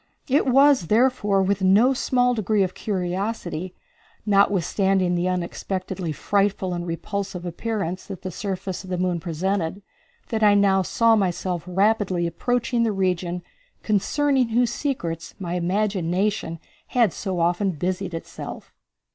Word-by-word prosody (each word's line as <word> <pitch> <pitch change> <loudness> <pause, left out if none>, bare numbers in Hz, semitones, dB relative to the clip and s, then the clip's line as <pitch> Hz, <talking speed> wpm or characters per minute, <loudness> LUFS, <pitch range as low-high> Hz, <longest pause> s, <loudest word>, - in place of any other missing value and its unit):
It 275 0 +2
was, 270 - +5
therefore, 210 -3 +3
with 200 0 0
no 205 +8 +5
small 250 -1 +2
degree 215 -2 +1
of 185 - -2
curiosity, 185 -2 -3 0.5
notwithstanding 195 -2 +2
the 175 +1 0
unexpectedly 185 0 -3
frightful 195 +2 0
and 175 0 -4
repulsive 185 +1 -4
appearance 185 0 -3
that 195 -4 -8
the 185 - -4
surface 190 0 -4
of 190 - -11
the 180 - -1
moon 180 -1 0
presented, 180 +2 -2 0.5
that 225 -1 -1
I 205 -1 +6
now 195 -1 +4
saw 230 +5 +3
myself 180 -3 -1
rapidly 190 -1 +1
approaching 240 +7 0
the 230 -1 +2
region 180 -2 -1 0.4
concerning 260 +5 +2
whose 235 +1 +2
secrets 170 - -3
my 175 -3 -4
imagination 185 0 0 0.3
had 235 -7 +2
so 190 -4 -3
often 175 +4 +1
busied 180 +1 -3
itself. 165 - -8
190 Hz, 130 wpm, -23 LUFS, 180-215 Hz, 0.5 s, I